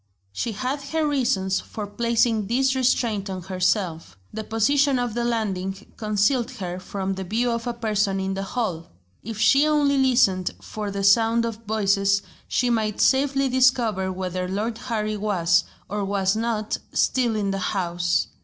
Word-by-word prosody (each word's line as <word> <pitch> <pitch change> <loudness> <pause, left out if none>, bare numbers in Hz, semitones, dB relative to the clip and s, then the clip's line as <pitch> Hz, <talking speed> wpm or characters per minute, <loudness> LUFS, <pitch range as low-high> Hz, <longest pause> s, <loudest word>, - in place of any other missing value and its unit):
She 225 - -2
had 260 +6 -3
her 310 +2 -1
reasons 235 -10 +1
for 210 - -6
placing 225 0 +1
this 265 +4 +2
restraint 235 -6 +1
on 185 -2 -5
herself. 185 - -1 0.2
The 220 - -4
position 270 +6 +2
of 245 -2 -1
the 240 +1 -1
landing 195 -4 -3
concealed 215 +4 +1
her 180 -6 -5
from 195 0 -3
the 190 0 -5
view 230 +6 0
of 230 0 -3
a 240 - -1
person 210 -4 0
in 190 0 -2
the 195 - -3
hall. 195 -5 -3 0.3
If 225 0 -7
she 275 +7 +4
only 290 -2 +3
listened 235 -9 +2
for 210 -1 -5
the 200 0 -3
sound 225 +3 +4
of 225 -1 -6
voices 200 -2 +2 0.2
she 245 0 +1
might 215 -3 0
safely 275 0 +3
discover 245 -7 +2
whether 185 0 -3
Lord 215 +5 -3
Harry 215 -4 -2
was, 185 -4 +2 0.2
or 205 0 -3
was 195 0 +1
not, 220 -1 -1
still 245 -4 +1
in 200 -2 0
the 195 - -2
house. 175 -3 0
215 Hz, 165 wpm, -24 LUFS, 195-240 Hz, 0.3 s, she